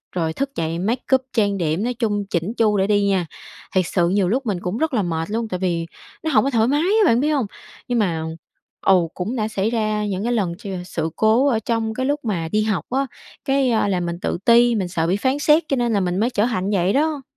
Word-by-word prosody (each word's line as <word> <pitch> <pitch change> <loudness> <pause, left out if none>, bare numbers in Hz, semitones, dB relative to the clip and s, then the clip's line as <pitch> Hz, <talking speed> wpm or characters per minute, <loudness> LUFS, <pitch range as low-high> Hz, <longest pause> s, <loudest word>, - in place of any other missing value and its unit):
rồi 165 -3 -1
thức 275 +9 -2
dậy 165 +1 -2
make 225 +7 -1
up, 260 - +1
trang 205 -4 +1
điểm, 165 +2 -1
nói 245 +2 -1
chung 215 -4 -1
chỉn 175 +5 -1
chu 215 -2 +3
để 190 0 +2
đi 205 -1 +2
nha. 190 -3 +1 0.5
Thiệt 185 -1 +3
sự 175 -1 +1
nhiều 195 0 +2
lúc 260 +6 0
mình 200 -5 -1
cũng 180 +4 -3
rất 315 +1 -1
là 225 - +2
mệt 165 -1 -2
luôn 225 +1 -1
tại 185 -4 -4
vì 170 -3 -1 0.4
nó 315 - -1
hổng 215 -6 +4
có 275 - +1
thoải 230 -4 +2
mái 290 +3 +2
á, 410 +5 +3
bạn 235 -8 +4
biết 295 +4 +1
hông? 280 -6 +1 0.4
Nhưng 245 -1 0
mà 170 -6 0 0.6
ừ, 180 -3 +4
cũng 200 +7 -3
đã 215 -3 -1
xảy 215 -1 -1
ra 215 -2 -1
những 195 -1 -2
cái 240 +2 0
lần 195 -7 0
ch 220 - -18 0.2
sự 160 -3 -3
cố 225 +5 +3
ở 235 -6 +2
trong 225 0 -1
cái 260 +3 -2
lúc 290 +2 0
mà 175 -7 -1
đi 215 - +2
học 210 -7 -1
á, 270 +2 0 0.4
cái, 270 -1 +2
à, 220 -2 +2
là 190 -2 0
mình 170 -1 -3
tự - - -1
ti, 235 0 +5
mình 195 -4 -1
sợ 165 -2 -1
bị 185 +3 +1
phán 260 +6 0
xét 300 +3 +4
cho 275 - +1
nên 240 -2 +1
là 205 - +2
mình 180 -1 -1
mới 230 +3 +2
trở 210 -3 +1
thành 205 -6 -1
như 205 - +1
vậy 180 +2 +1
đó. 300 0 +1
215 Hz, 265 wpm, -21 LUFS, 185-245 Hz, 0.6 s, ti